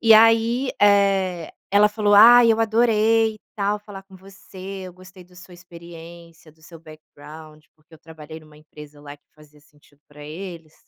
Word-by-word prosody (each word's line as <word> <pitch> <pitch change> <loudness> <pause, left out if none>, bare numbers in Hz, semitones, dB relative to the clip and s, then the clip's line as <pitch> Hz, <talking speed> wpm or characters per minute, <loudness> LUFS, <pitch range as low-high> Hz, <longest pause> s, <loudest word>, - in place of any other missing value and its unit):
E 225 -1 +5
aí, 230 +3 +2
eh, 195 -4 0 0.2
ela 205 +1 +3
falou: 210 -1 -1
"Ai, 230 +2 +6
eu 225 - -3
adorei, 225 0 0
e - - -19 0.2
tal, 205 0 -2
falar 205 -2 -13
com 195 0 -21
você, 190 0 -18 0.3
eu 180 - -12
gostei 185 0 -17
do 180 0 -25
sua 180 0 -16
experiência, 170 -1 -16
do 160 +1 -31
seu 165 +1 -15
backgound", 155 0 -16
porque 155 +1 -24
eu - - -19
trabalhei 160 0 -13
em 155 - -20
uma 150 -1 -21
empresa 150 -1 -16
lá 145 0 -12
que 145 - -48
fazia 150 -1 -22
sentido 145 0 -29
para 145 0 -17
eles, 165 0 -11
180 Hz, 180 wpm, -20 LUFS, 155-210 Hz, 0.3 s, Ai